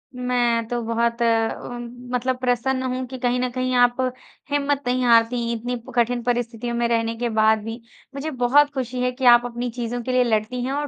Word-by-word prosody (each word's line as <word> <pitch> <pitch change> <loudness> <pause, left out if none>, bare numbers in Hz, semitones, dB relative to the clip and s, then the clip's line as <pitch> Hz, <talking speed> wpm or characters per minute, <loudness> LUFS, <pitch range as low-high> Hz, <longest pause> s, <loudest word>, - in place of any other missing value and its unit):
मैं 240 -2 0
तो 240 0 -2
बहुत 235 +1 -1
अ, 225 -1 +2
उम, 240 0 -6 0.3
मतलब 255 +1 0
प्रसन्न 255 +1 0
हूँ। 255 0 -3
कि 260 +1 -7
कहीं 245 0 0
न 250 0 0
कहीं 255 +1 -2
आप 245 0 +4 0.5
हिम्मत 285 0 0
नहीं 250 0 +1
हारती, 235 0 +3
इतनी 245 +2 -3 0.2
कठिन 240 0 +1
परिस्थितियों 240 0 -2
में 235 0 +1
रहने 230 -1 0
के 240 0 -1
बाद 220 0 +3
भी। 225 +2 -6 0.3
मुझे 305 +3 -4
बहुत 270 +3 +3
खुशी 255 -2 -3
है 250 0 +1
कि 255 +1 -4
आप 240 0 0
अपनी 245 +1 -4
चीज़ों 240 0 -4
के 255 - -3
लिए 255 0 +4
लड़ती 230 +1 -1
हैं 260 - -2
और 290 +1 -2
245 Hz, 205 wpm, -22 LUFS, 235-255 Hz, 0.5 s, आप